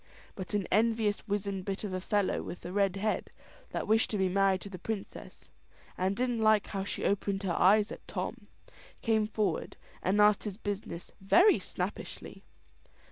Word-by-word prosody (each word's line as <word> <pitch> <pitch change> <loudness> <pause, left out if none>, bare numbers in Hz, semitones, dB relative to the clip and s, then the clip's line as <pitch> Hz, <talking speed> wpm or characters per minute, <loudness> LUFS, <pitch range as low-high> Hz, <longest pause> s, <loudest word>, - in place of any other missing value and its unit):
But 190 +2 -5
an 200 -3 0
envious 220 0 +2
wizened 200 -2 -2
bit 195 +2 -4
of 200 -3 -4
a 185 - -2
fellow, 205 0 +1
with 175 - -8
a 175 - -4
red 195 -1 +2
head, 210 +2 -1 0.4
that - - -3
wished 220 +1 +3
to 210 - -1
be 190 -1 +2
married 195 0 +2
to 200 - -8
the 185 - -7
princess, 210 +1 -6 0.5
and 190 +2 0
didn't 245 0 0
like 215 -2 +4
how 195 -2 -3
she 195 - -3
opened 200 0 0
her 185 -3 0
eyes 205 +4 +4
at - - -9
Tom, - - -5 0.6
came 220 -2 +2
forward, 215 -1 -1 0.2
and 195 +3 +1
asked 210 0 +5
his 200 -2 -4
business 200 -5 -5
very 350 - +5
snappishly. - - -5
200 Hz, 175 wpm, -31 LUFS, 190-215 Hz, 0.6 s, asked